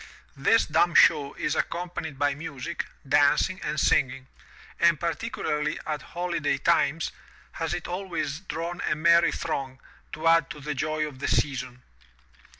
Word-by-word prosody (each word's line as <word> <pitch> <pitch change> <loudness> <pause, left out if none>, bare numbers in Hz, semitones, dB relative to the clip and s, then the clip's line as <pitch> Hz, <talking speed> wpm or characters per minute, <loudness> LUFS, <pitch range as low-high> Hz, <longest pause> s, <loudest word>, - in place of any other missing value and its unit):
This - - +3
dumb 175 - +2
show 145 -4 +5
is - - -1
accompanied 170 -4 -3
by 145 0 +1
music, 150 +1 -5 0.2
dancing, 145 +6 +3
and 155 - -2
singing, 130 -1 +2 0.5
and 170 -3 +4
particularly 165 -5 -2
at 150 -2 -3
holiday 170 -4 -2
times 160 +1 +1 0.4
has 165 +1 -3
it 175 - -6
always 175 -5 -3
drawn 175 -1 -5
a - - +1
merry 170 +2 +4
throng, 130 -1 -4 0.3
to 160 +1 -2
add 165 0 +4
to 160 -3 -8
the 150 +1 -4
joy 155 +2 -1
of 135 -3 -11
the - - -2
season. 130 -3 -1
155 Hz, 145 wpm, -26 LUFS, 140-170 Hz, 0.5 s, show